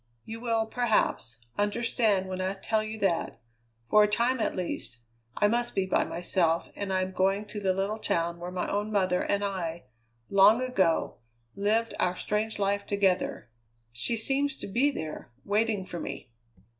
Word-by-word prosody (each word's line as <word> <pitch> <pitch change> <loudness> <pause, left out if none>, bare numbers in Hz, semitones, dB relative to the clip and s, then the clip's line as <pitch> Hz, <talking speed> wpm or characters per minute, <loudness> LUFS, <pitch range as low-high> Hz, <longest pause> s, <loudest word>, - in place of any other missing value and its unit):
You 225 +1 -6
will, 230 -2 0
perhaps, 220 - 0 0.2
understand 205 -2 +1
when 185 0 -4
I 190 +1 -1
tell 215 +3 0
you 215 +1 -5
that, 175 - 0 0.5
for 210 - +5
a 210 - +5
time 235 +4 +1
at 220 - 0
least, 175 -9 -4 0.4
I 210 - +4
must 240 +2 0
be 195 - +2
by 190 - +2
myself, 170 -1 0
and 200 -1 -3
I 185 0 +2
am 185 - -4
going 195 +2 +1
to 210 0 -6
the 195 -2 +1
little 195 +3 -1
town 170 -4 -1
where 175 +1 -5
my 180 0 -3
own 205 +1 -1
mother 185 -3 +2
and 200 0 0
I, 175 -4 -3 0.4
long 200 +4 +6
ago, 195 -10 +1 0.4
lived 220 +3 +1
our 180 0 +1
strange 215 +3 -2
life 200 0 0
together. 195 - 0 0.4
She 120 - -1
seems 270 +4 +1
to - - -7
be 245 +9 +2
there, 160 - -6 0.2
waiting 210 -1 +1
for 175 - -6
me. 125 - -6
200 Hz, 170 wpm, -28 LUFS, 185-220 Hz, 0.5 s, long